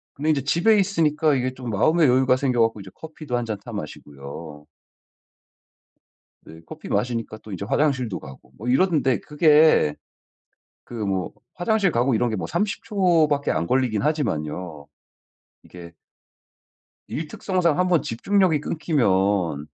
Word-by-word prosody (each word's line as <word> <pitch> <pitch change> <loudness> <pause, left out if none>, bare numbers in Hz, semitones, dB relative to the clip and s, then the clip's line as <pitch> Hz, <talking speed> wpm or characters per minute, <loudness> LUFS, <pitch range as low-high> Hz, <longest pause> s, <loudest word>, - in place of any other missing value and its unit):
근데 150 +3 -2
이제 140 - 0
집에 175 +10 +3
있으니까 160 -6 +1
이게 130 0 -1
좀 125 -2 -7
마음의 155 - +3
여유가 130 0 +3
생겨 130 -2 0
갖고 115 -1 +1
이제 95 - -11
커피도 155 -3 -7
한 120 - -3
잔 110 -2 -4
타 120 - -9
마시고요. 75 -4 -9 1.8
네 80 0 -13
커피 - - -10
마시니까 115 -3 -2
또 110 - -13
이제 100 +1 -5
화장실도 130 -4 0
가고 70 -1 -13
뭐 110 - -8
이러는데 140 -3 +2
그게 150 - +4 0.9
그 120 - -11
뭐 95 -3 -2 0.2
화장실 205 +1 +1
가고 120 0 +1
이런 120 +2 +1
게 110 - -2
뭐 95 - -4
30 205 +5 -2
초 185 -8 +2
밖에 145 -1 -1
안 85 - -1
걸리긴 125 -3 +1
하지만요. 90 - -3 0.8
이게 85 -1 -12 1.2
일 155 +1 -4
특성상 170 -1 -1
한번 180 -3 +2
집중력이 180 - +1
끊기면 100 - 0
130 Hz, 290 characters per minute, -23 LUFS, 100-160 Hz, 1.8 s, 그게